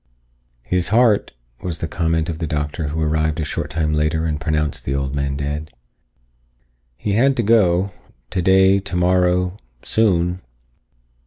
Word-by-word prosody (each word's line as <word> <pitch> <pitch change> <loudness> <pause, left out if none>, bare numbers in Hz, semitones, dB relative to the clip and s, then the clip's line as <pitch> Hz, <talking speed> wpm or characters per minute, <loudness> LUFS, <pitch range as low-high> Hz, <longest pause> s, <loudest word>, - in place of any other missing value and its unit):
"His 90 -1 0
heart," 110 -1 +3 0.3
was 85 -3 -3
the 80 - -3
comment 80 0 0
of 80 -2 -4
the 80 - -2
doctor 75 +1 -2
who 75 +3 -3
arrived 80 +1 0
a 80 - -1
short - - -3
time 75 0 -1
later 75 +1 0
and 75 -2 -2
pronounced 75 -1 -1
the 70 - -2
old 70 -1 -2
man 70 -1 -1
dead. 75 +2 -4 1.3
"He 100 - -2
had 130 +5 +3
to 120 - +1
go. 100 -4 +3 0.4
Today, 95 +1 +4
tomorrow. 90 0 +1 0.2
Soon." 90 -5 +1
85 Hz, 145 wpm, -20 LUFS, 75-95 Hz, 1.3 s, Today